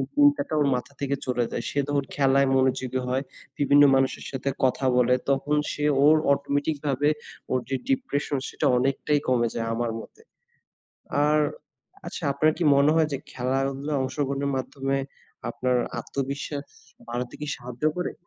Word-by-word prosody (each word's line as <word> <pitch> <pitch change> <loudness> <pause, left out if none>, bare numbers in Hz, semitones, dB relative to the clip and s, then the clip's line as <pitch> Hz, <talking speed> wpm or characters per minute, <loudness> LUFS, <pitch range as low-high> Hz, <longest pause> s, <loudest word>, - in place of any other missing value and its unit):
চিন্তাটা 145 +1 +4
ওর 145 - +3
মাথা 125 +3 -5
থেকে 140 0 0
চলে 125 -1 0
যায। - - -2
সে 145 - -1
যখন 145 -1 0
খেলায় 140 -1 +3
মনোযোগী 130 -1 +1
হয়, 130 +2 0 0.3
বিভিন্ন 145 0 +5
মানুষের 135 0 0
সাথে 135 +1 -2
কথা 130 +1 +2
বলে, 125 0 +4
তখন 140 +2 +1 0.2
সে 150 - -2 0.2
ওর 155 +1 +7 0.2
অটোমেটিকভাবে 145 0 0 0.4
ওর 130 - +2
যে 135 - 0
ডিপ্রেশন 250 - 0
সেটা - - -3
অনেকটাই 135 +3 +1
কমে 120 -2 +3
যায় 115 0 -2
আমার 115 0 -1
মতে। 450 - -13 1.0
আর 150 +1 +3 0.7
আচ্ছা, - - -6
আপনার 155 +3 +3
কি 175 - 0
মনে 140 +2 +5
হয় 160 -1 +3
যে 140 - -1
খেলাধুলায় 135 +3 -1
অংশগ্রহণের 140 +1 -1
মাধ্যমে 135 +1 -2 0.5
আপনার 125 0 0 0.2
আত্মবিশ্বাস 140 +3 -4 0.4
বাড়াতে 120 +1 -4
কি 150 - -4
সাহায্য 125 +2 -8
করে? 180 - -2
140 Hz, 150 wpm, -25 LUFS, 130-145 Hz, 1.0 s, ওর